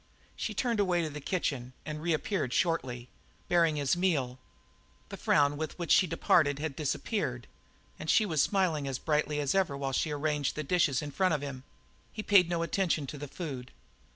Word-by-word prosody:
She - - -4
turned 235 -4 0
away 180 -4 +2
to 155 - -3
the 150 +1 -7
kitchen 135 -7 -2
and 155 0 -5
reappeared 165 - -1
shortly, 130 -9 0 0.4
bearing 165 -3 +3
his 145 +1 +1
meal. 145 -9 0 0.7
The - - -6
frown 145 0 +2
with 155 0 -4
which 170 -2 -3
she 185 - +6
departed 155 -3 +3
had 150 -1 -3
disappeared, 145 - -2 0.5
and 155 - -5
she 220 - +5
was 160 -7 +1
smiling 175 -8 +1
as 135 -2 -2
brightly 150 0 0
as 140 -2 0
ever 185 -8 +1
while 135 -1 -3
she 155 - +1
arranged 150 -1 -1
the 155 - -3
dishes 150 -4 +2
in 145 - -5
front 185 +1 +2
of 145 - -4
him. 135 -2 -6 0.5
He 215 - -5
paid 190 -5 +5
no 170 -1 0
attention 170 -3 0
to 145 - -7
the 145 - -6
food. 135 -5 -6
155 Hz, 185 wpm, -30 LUFS, 140-175 Hz, 0.7 s, she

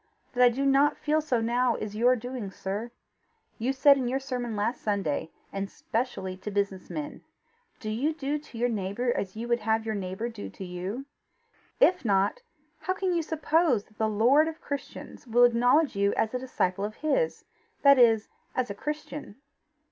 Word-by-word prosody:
That 250 - 0
I 245 - +8
do 265 +4 -1
not 275 +2 +4
feel 310 +1 +1
so 255 -6 0
now, 240 +1 +2
is 210 -1 -5
your 245 +3 +4
doing, 245 -3 -5
sir. 200 +5 -4 0.7
You 240 +4 +1
said 280 +1 +6
in 255 -2 -1
your 255 +2 0
sermon 250 -4 -4
last 220 +4 -1
Sunday, 195 -7 -1 0.2
and 195 0 -3
specially 220 -6 -3
to 190 +3 -6
business 200 -2 -2
men: 295 -1 -6 0.6
'Do 215 - -4
you 265 +8 0
do 300 -1 -2
to 290 -5 -13
your 240 +2 +2
neighbour 225 +2 -1
as 190 0 -3
you 230 +2 -5
would 240 0 +2
have 220 +1 0
your 220 - -1
neighbour 195 +2 -3
do 225 -3 -7
to 190 - -8
you? 185 +9 -5 0.7
If - - +4
not, 200 - +2 0.4
how 370 - -2
can 375 -1 0
you 340 - +1
suppose 315 -6 +1
that 215 - -27
the 220 0 +2
lord 245 +9 +4
of 320 0 -5
Christians 280 -2 -7
will 240 +1 +4
acknowledge 245 +5 +4
you 200 0 +2
as 220 - 0
a 250 - -1
disciple 195 -7 -1
of 215 +1 -3
his, 475 +11 0 0.4
that 280 -2 +7
is, 225 -3 +5 0.3
as 250 -4 0
a - - -3
Christian? 300 -1 -6
240 Hz, 185 wpm, -28 LUFS, 210-275 Hz, 0.7 s, I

